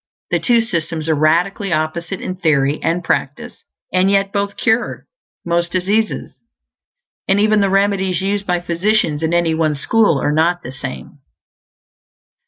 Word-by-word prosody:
The - - +2
two 235 -2 +3
systems 165 -7 -3
are - - +4
radically 175 +6 +1
opposite 170 +4 -2
in 185 - -4
theory 150 -5 +1
and 175 +2 -1
practice; 140 -3 -3 0.3
and 185 +1 +3
yet 195 0 +1
both 200 0 -2
"cure" 235 0 0 0.4
most 170 0 0
diseases. 205 +4 -1 0.9
And 195 +1 +3
even 215 0 +3
the 200 - +2
remedies 195 -2 +1
used 200 +1 -2
by 175 -1 0
physicians 175 -2 0
in 160 0 0
any 170 -1 +2
one 160 -2 0
school 185 +1 +2
are 145 - 0
not 170 +3 +1
the 125 - -7
same. 135 +2 -8
175 Hz, 150 wpm, -18 LUFS, 160-200 Hz, 0.9 s, are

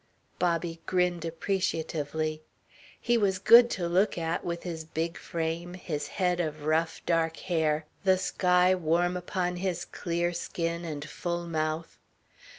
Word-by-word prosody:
Bobby 170 -1 0
grinned 180 -2 +1
appreciatively. 160 -3 -2 0.6
He 240 -1 +2
was 195 -3 +2
good 235 +5 +8
to 175 -2 -1
look 185 +4 +2
at, 165 0 -1
with 170 0 -3
his 165 -3 -4
big 165 +1 -3
frame, 170 +2 -3
his 150 -5 -4
head 180 0 0
of 155 -3 -2
rough 160 +1 0
dark 165 -1 +1
hair, 160 -3 0 0.2
the 190 -1 +4
sky 180 -1 +3
warm 175 0 +1
upon 180 0 -2
his 180 -2 -2
clear 175 0 -2
skin 170 0 -3
and 150 -2 -5
full 175 0 -3
mouth. 155 0 -2
170 Hz, 140 wpm, -29 LUFS, 160-180 Hz, 0.6 s, good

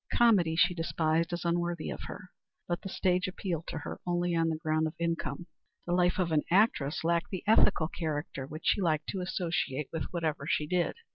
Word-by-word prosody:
Comedy 195 -9 +4
she 175 +2 +4
despised 165 0 0
as 175 0 -3
unworthy 170 -1 -1
of - - -6
her. 185 - -9 0.4
But 175 0 -2
the 195 - -6
stage 185 0 +1
appealed 180 -3 -4
to - - -4
her 155 - -6
only 175 0 +1
on 165 0 +2
the 160 - 0
ground 155 -1 0
of 155 - -7
income. 170 -1 -2 0.4
The 175 - -1
life 180 0 +3
of 180 -3 0
an 155 -1 +3
actress 170 -8 +2
lacked 170 0 +1
the 185 - -4
ethical 210 -6 +4
character 145 -5 -4
which 155 +2 -8
she 205 - +3
liked 155 -4 0
to 190 - -2
associate 165 -6 -2
with 160 - -2
whatever 160 -5 -2
she 150 - +1
did. 175 +2 0
170 Hz, 200 wpm, -30 LUFS, 155-180 Hz, 0.4 s, Comedy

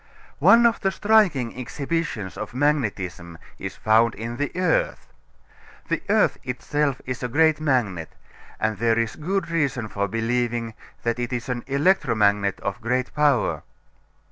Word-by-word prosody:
One 235 +1 +6
of 230 -1 +3
the 195 - +1
striking 190 - +2
exhibitions 130 - -3
of - - -7
magnetism 100 - -1 0.2
is - - -5
found 110 +1 +3
in 115 +2 -5
the 145 +1 -2
earth. 180 -3 0 0.8
The - - 0
earth - - +3
itself 135 +2 -1
is 130 -1 -4
a 125 - -1
great 155 +5 +3
magnet; 110 - 0 0.5
and 110 -2 -1
there 115 -1 +2
is 115 -1 -1
good 170 +2 -2
reason 140 -8 0
for 100 0 -1
believing 115 +1 -1 0.3
that 115 +1 -1
it 120 -1 -3
is 125 0 -4
an 120 -1 -2
electromagnet 115 - +2
of 100 +5 -4
great 125 +2 -1
power. 145 -5 +2
125 Hz, 140 wpm, -24 LUFS, 115-150 Hz, 0.8 s, One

